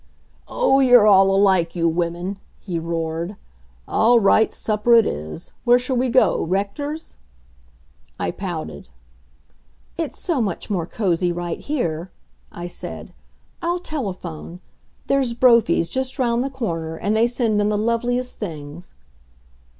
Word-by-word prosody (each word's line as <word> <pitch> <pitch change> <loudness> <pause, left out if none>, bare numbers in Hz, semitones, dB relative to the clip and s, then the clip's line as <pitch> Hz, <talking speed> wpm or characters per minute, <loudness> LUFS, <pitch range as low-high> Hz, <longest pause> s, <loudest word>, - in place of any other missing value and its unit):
"Oh, 275 - +2
you're 245 -5 +6
all 195 -2 +6
alike, 190 -4 +3
you 170 -1 +1
women!" 175 +3 -2 0.2
he 175 -4 -4
roared. 165 +2 -3 0.5
"All 235 +2 +4
right, 220 +1 +4
supper 215 +2 +2
it 230 -2 +6
is. 80 - -5
Where 245 0 +5
shall 255 +1 -2
we 250 +1 +1
go 255 +2 +3
Rector's?" 205 - -3 1.0
I - - -1
pouted. - - -6 1.1
"It's 325 -3 -3
so 330 -8 0
much 205 0 -3
more 175 -5 -1
cozy 180 -4 0
right 175 -1 -4
here," 175 - -3 0.4
I 175 - -7
said. 175 - -7 0.5
"I'll 345 +1 0
telephone. 185 - -6 0.5
There's 265 -4 +1
Brophy's, 235 -9 +4
just 260 +6 -3
round 240 -2 +1
the 275 - -2
corner, 165 -12 -4
and 205 +5 -1
they 225 +2 +4
send 235 -4 0
in 205 - +1
the 210 - 0
loveliest 240 +3 -1
things." 160 -2 -8
210 Hz, 135 wpm, -21 LUFS, 175-245 Hz, 1.1 s, you're